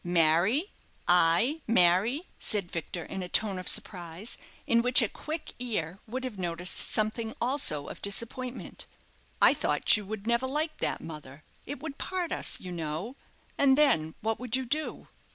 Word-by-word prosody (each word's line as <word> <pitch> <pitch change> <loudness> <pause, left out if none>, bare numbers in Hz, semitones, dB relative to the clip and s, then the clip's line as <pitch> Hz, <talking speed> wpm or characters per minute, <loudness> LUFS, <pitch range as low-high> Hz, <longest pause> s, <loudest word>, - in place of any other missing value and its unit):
"Marry 175 - +2 0.3
I 180 - +3
marry?" 215 - +3 0.2
said 200 -5 +1
Victor, 170 +1 -5
in 190 - -6
a 180 - -6
tone 200 -2 +2
of 185 - -7
surprise, 175 +3 0 0.3
in 235 0 +3
which 250 +2 +5
a - - +1
quick 310 +8 -7
ear 195 -8 -3
would 255 +4 -4
have 240 -7 -6
noticed 175 0 0
something 220 +1 +2
also 240 - +2
of - - -9
disappointment. 235 +5 -2 0.6
"I - - +8
thought - - +3
you 210 - -6
would 215 -1 -6
never 235 +2 +1
like 305 +3 -1
that, - - -2
mother. 150 -2 -10 0.2
It 285 0 -5
would 300 -3 -6
part 365 -2 -3
us, - - +1
you 180 - -8
know, 170 - -4 0.4
and 275 -1 +5
then 160 - +3
what 220 +1 -1
would 250 -1 -1
you 260 0 -1
do?" 305 +6 -3
215 Hz, 165 wpm, -28 LUFS, 175-255 Hz, 0.6 s, I